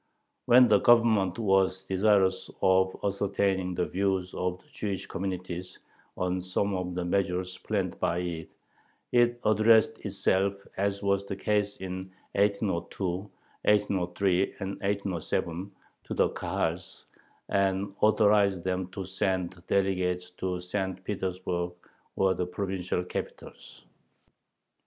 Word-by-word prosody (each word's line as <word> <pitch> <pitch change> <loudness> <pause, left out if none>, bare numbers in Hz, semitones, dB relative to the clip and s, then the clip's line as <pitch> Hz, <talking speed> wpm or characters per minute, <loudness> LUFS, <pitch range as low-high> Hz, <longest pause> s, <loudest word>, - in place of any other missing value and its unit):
When 125 +1 +8
the 105 -3 +5
Government 110 -6 +4
was 95 -3 +2
desirous 95 -1 +2
of 95 0 +3
ascertaining 100 -2 0
the 90 - +1
views 95 -1 -1
of 90 0 -2
the - - -27
Jewish 100 -3 -3
communities 90 -1 -5 0.4
on 90 0 -1
some 95 +2 -1
of 90 -1 -3
the 90 -1 -2
measures 90 0 0
planned - - -2
by 85 - +1
it, 85 -2 -4 0.6
it 120 0 +3
addressed 110 +1 +4
itself, 95 +1 +1 0.2
as 100 +1 -1
was 100 0 +2
the 100 - -4
case 105 0 0
in 95 0 -6 0.2
1802, 100 -2 0 0.6
1803, 95 -2 +2 0.2
and 95 -2 -3
1807, 95 -2 -2 0.3
to - - -5
the - - +3
Kahals, - - -3 0.4
and 100 0 +1
authorized 105 -4 +4
them 95 -1 -1
to 95 +1 -6
send 95 -2 -2
delegates 90 -2 0
to 90 0 -3
St. 95 0 -3
Petersburg 90 -3 -2 0.4
or 95 -1 +3
the 90 0 -2
provincial 90 -1 -2
capitals. 90 - -8
95 Hz, 120 wpm, -28 LUFS, 90-100 Hz, 0.6 s, When